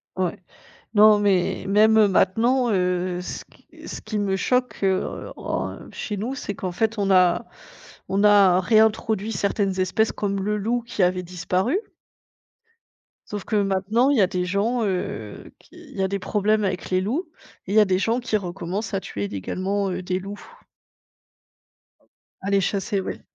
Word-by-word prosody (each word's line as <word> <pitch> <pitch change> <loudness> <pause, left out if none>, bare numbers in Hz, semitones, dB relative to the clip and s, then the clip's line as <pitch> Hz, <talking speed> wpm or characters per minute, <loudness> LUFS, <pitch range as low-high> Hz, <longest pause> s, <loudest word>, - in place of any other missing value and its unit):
Ouais. 185 -2 -1 0.6
Non, 215 0 +7
mais, 195 -3 +1
même 215 +1 +5
maintenant, 235 +7 +2
heu, 180 -1 0
ce - - -6
qui - - -25 0.2
ce - - -6
qui 215 -1 -3
me 195 -2 0
choque, 250 +2 0
heu, 190 -1 -1
en - - -4
chez 210 - -5
nous, 240 +7 -3
c'est 205 - -5
qu'en 185 -2 -4
fait, 220 +3 -1
on 195 -1 0
a 185 +4 +4 0.6
on 200 +2 +1
a 200 -3 +6
réintroduit 220 0 +2
certaines 200 -1 -1
espèces, 185 +4 +1
comme 200 -1 -2
le 210 +1 0
loup 230 +4 -1
qui 225 - -3
avait 180 0 +1
disparu. 185 - -1 1.5
Sauf 205 -1 -5
que - - -2
maintenant, 205 +5 +2
il 285 - +3
y 210 - +5
a 185 - +4
des 180 -1 -2
gens, 215 +6 0
heu, 180 - -4
qui - - -24
il - - -13
y 195 - 0
a - - +2
des 200 - -2
problèmes 215 +2 +1
avec 185 -1 -3
les 185 0 +2
loups 255 - -2 0.4
et 195 - -4
il - - 0
y - - +7
a 210 - +6
des 185 -1 +1
gens 230 +4 +1
qui 235 -3 -2
recommencent 190 +2 -5
à 195 - +1
tuer 100 - -5
illégalement, 190 - -2
heu, 185 0 -3
des 185 +1 -1
loups. 200 +2 -8 2.0
À 195 - -4
les 200 -1 +3
chasser, 200 +1 -1
oui. - - -5
200 Hz, 175 wpm, -23 LUFS, 185-215 Hz, 2.0 s, Non